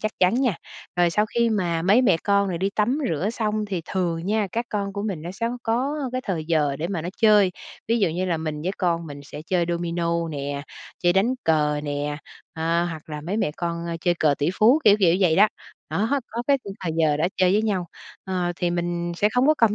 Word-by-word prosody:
chắc 215 Hz, 0 st, -2 dB
chắn 185 Hz, +4 st, +4 dB
nha. 250 Hz, -7 st, +1 dB, 0.4 s
Rồi 175 Hz, -1 st, +3 dB
sau 210 Hz, +5 st, +2 dB
khi 235 Hz, +1 st, +1 dB
mà 175 Hz, -6 st, 0 dB
mấy 205 Hz, +8 st, +5 dB
mẹ 220 Hz, -, +4 dB
con 200 Hz, -1 st, +3 dB
rồi 170 Hz, -2 st, -2 dB
đi 195 Hz, +2 st, 0 dB
tắm 230 Hz, +8 st, +1 dB
rửa 170 Hz, +7 st, -1 dB
xong 215 Hz, -2 st, -1 dB
thì 190 Hz, -4 st, -3 dB
thường 170 Hz, -3 st, -1 dB
nha, 210 Hz, 0 st, +1 dB
các 235 Hz, +1 st, -2 dB
con 200 Hz, -1 st, -2 dB
của 200 Hz, 0 st, -4 dB
mình 195 Hz, -8 st, -3 dB
nó 170 Hz, -, -5 dB
sẽ 230 Hz, +4 st, -2 dB
có 245 Hz, +1 st, -5 dB, 0.4 s
có 260 Hz, -, -2 dB
cái 255 Hz, -, -1 dB
thời 175 Hz, -6 st, -2 dB
giờ 150 Hz, -4 st, +1 dB
để 165 Hz, -, -2 dB
mà 175 Hz, -5 st, -3 dB
nó 175 Hz, -, -4 dB
chơi, 210 Hz, -4 st, +5 dB, 0.4 s
ví 230 Hz, +1 st, +2 dB
dụ 195 Hz, -5 st, +3 dB
như 175 Hz, +4 st, -2 dB
là 175 Hz, -3 st, 0 dB
mình 155 Hz, -1 st, -4 dB
với 185 Hz, -, -1 dB
con 170 Hz, -3 st, 0 dB
mình 145 Hz, -1 st, -8 dB
sẽ 150 Hz, +1 st, -9 dB
chơi 180 Hz, -2 st, +1 dB
domino 170 Hz, -1 st, -1 dB
nè, 140 Hz, -1 st, -4 dB, 0.4 s
chơi 175 Hz, -1 st, +3 dB
đánh 215 Hz, +7 st, +2 dB
cờ 150 Hz, -2 st, +2 dB
nè, 145 Hz, 0 st, -2 dB, 0.4 s
ơ, 165 Hz, +1 st, +1 dB
hoặc 160 Hz, -3 st, -5 dB
là 150 Hz, -, -5 dB
mấy 175 Hz, +8 st, -3 dB
mẹ 185 Hz, -, +1 dB
con, 170 Hz, -2 st, -3 dB
ơ, 170 Hz, -, -3 dB
chơi 175 Hz, 0 st, +2 dB
cờ 150 Hz, -2 st, +4 dB
tỉ 145 Hz, +3 st, +1 dB
phú, 240 Hz, +8 st, +6 dB
kiểu 205 Hz, -1 st, +7 dB
kiểu 180 Hz, -2 st, +5 dB
vậy 170 Hz, -4 st, +3 dB
đó, 210 Hz, +2 st, +6 dB, 0.4 s
đó, 230 Hz, +8 st, +1 dB
có 235 Hz, +2 st, -4 dB
cái 280 Hz, -1 st, +4 dB
khung 195 Hz, -1 st, -6 dB
thời 165 Hz, -4 st, -2 dB
giờ 150 Hz, -2 st, +3 dB
đó 160 Hz, -, +1 dB
chơi 185 Hz, -1 st, +3 dB
với 210 Hz, +2 st, +3 dB
nhau, 190 Hz, -5 st, -1 dB, 0.4 s
ờ, 180 Hz, -2 st, -1 dB
thì 175 Hz, -, 0 dB
mình 175 Hz, 0 st, -2 dB
sẽ 210 Hz, -, +3 dB
không 250 Hz, +2 st, +4 dB
có 310 Hz, -, +5 dB
cầm 220 Hz, -3 st, +4 dB
180 Hz, 245 wpm, -24 LUFS, 165-210 Hz, 0.4 s, kiểu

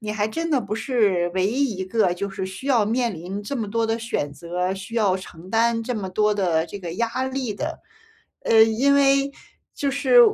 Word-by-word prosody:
你 210 Hz, -1 st, -4 dB
还 215 Hz, 0 st, 0 dB
真 330 Hz, +8 st, -3 dB
的 280 Hz, -4 st, +3 dB
不 210 Hz, -1 st, -4 dB
是 210 Hz, -8 st, +1 dB
唯 185 Hz, -, +1 dB
一 260 Hz, +3 st, +1 dB
一 190 Hz, -, -3 dB
个 190 Hz, -2 st, +1 dB
就 200 Hz, +2 st, -4 dB
是 190 Hz, -1 st, -4 dB
需 195 Hz, +9 st, -7 dB
要 235 Hz, -6 st, +4 dB
面 235 Hz, 0 st, 0 dB
临 185 Hz, +5 st, -6 dB
这 270 Hz, +7 st, -4 dB
么 215 Hz, -3 st, -3 dB
多 230 Hz, +2 st, 0 dB
的 225 Hz, +1 st, -1 dB
选 225 Hz, -, -3 dB
择， 175 Hz, +4 st, -3 dB
需 200 Hz, +5 st, -8 dB
要 205 Hz, -5 st, +2 dB
承 185 Hz, -1 st, -11 dB
担 230 Hz, +1 st, +2 dB
这 245 Hz, +2 st, -3 dB
么 195 Hz, -4 st, -4 dB
多 210 Hz, +3 st, +2 dB
的 175 Hz, -6 st, +1 dB
这 200 Hz, -, -8 dB
个 170 Hz, -3 st, -6 dB
压 235 Hz, +5 st, -1 dB
力 260 Hz, -4 st, -2 dB
的。 305 Hz, +10 st, -5 dB, 0.6 s
呃， 220 Hz, -1 st, +6 dB
因 235 Hz, +6 st, +3 dB
为 275 Hz, 0 st, +3 dB, 0.4 s
就 280 Hz, -1 st, -1 dB
是 485 Hz, -, +5 dB
215 Hz, 230 characters per minute, -23 LUFS, 190-250 Hz, 0.6 s, 呃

